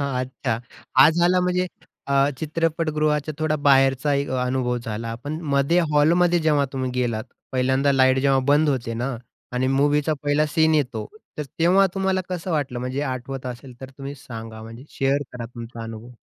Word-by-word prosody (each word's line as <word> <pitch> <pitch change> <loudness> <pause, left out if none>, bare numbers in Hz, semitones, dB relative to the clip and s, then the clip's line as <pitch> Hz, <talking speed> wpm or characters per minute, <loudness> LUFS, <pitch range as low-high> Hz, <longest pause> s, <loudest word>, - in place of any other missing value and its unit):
अच्छा, 130 -4 -2 0.4
हा, 130 +3 +9
झाला 175 +2 +3
म्हणजे 180 0 +1 0.4
अ, 140 0 +3
चित्रपटगृहाच्या 155 -1 0
थोडा 155 -1 +1
बाहेरचा 135 0 +3
एक 140 0 -1
अनुभव 125 -1 0
झाला. 115 -1 -5
पण 155 +3 -4
मध्ये 140 +5 +3
हॉलमध्ये 170 +4 +4
जेव्हा 150 -3 +2
तुम्ही 130 -1 -2
गेलात, 120 -3 -1 0.3
पहिल्यांदा 130 +2 +2
लाईट 130 -1 +4
जेव्हा 135 0 +3
बंद 150 +2 +4
होते 120 -5 -1
ना 125 +2 -2 0.4
आणि 125 +1 0
मूवीचा 145 +3 +2
पहिला 145 +1 +2
सीन 160 +1 +2
येतो, 125 -8 -1 0.3
तर - - 0 0.2
तेव्हा 185 +4 +5
तुम्हाला 190 -1 +1
कसं 180 0 -4
वाटलं? 140 -6 -1
म्हणजे 125 +2 -3
आठवत 130 -1 -4
असेल 125 0 -8
तर 130 0 -8
तुम्ही 140 +1 -6
सांगा, 115 -4 -9
म्हणजे 115 +3 -10
शेअर 135 +1 +2
करा 120 -1 -6
तुमचा 115 -1 -8
अनुभव. 115 +1 -8
135 Hz, 160 wpm, -23 LUFS, 125-155 Hz, 0.4 s, हा